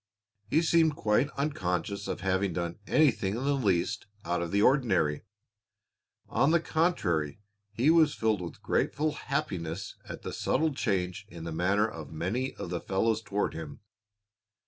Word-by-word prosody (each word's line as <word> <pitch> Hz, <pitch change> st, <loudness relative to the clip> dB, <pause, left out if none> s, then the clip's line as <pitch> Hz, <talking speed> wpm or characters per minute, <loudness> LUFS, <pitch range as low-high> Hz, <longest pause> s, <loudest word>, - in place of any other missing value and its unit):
He 160 Hz, +6 st, +3 dB
seemed 165 Hz, -2 st, +4 dB
quite 110 Hz, +5 st, +2 dB
unconscious 100 Hz, -, -2 dB
of -, -, -3 dB
having 95 Hz, 0 st, +1 dB
done 85 Hz, +2 st, -3 dB
anything 115 Hz, -9 st, +3 dB
in 125 Hz, -, -3 dB
the 145 Hz, +1 st, +2 dB
least 100 Hz, -6 st, 0 dB, 0.2 s
out 85 Hz, 0 st, 0 dB
of 85 Hz, -, -2 dB
the 100 Hz, +1 st, +3 dB
ordinary. 95 Hz, -, +3 dB, 1.1 s
On 135 Hz, +6 st, +2 dB
the 170 Hz, +1 st, +4 dB
contrary, 105 Hz, -, 0 dB, 0.3 s
he 120 Hz, +9 st, +3 dB
was 160 Hz, -3 st, +5 dB
filled 110 Hz, -4 st, +1 dB
with 85 Hz, -, -8 dB
grateful 155 Hz, +2 st, +1 dB
happiness 100 Hz, -, -3 dB, 0.2 s
at -, -, -7 dB
the -, -, -5 dB
subtle 160 Hz, -1 st, +1 dB
change 100 Hz, -5 st, -1 dB
in 85 Hz, -5 st, -9 dB
the 85 Hz, -, -4 dB
manner 95 Hz, +6 st, +2 dB
of 80 Hz, -8 st, -8 dB
many 95 Hz, +12 st, -2 dB
of 85 Hz, -, -6 dB
the 85 Hz, -, -2 dB
fellows 110 Hz, +3 st, +1 dB
toward 105 Hz, -1 st, -1 dB
him. 80 Hz, -3 st, -8 dB
100 Hz, 155 wpm, -29 LUFS, 90-140 Hz, 1.1 s, was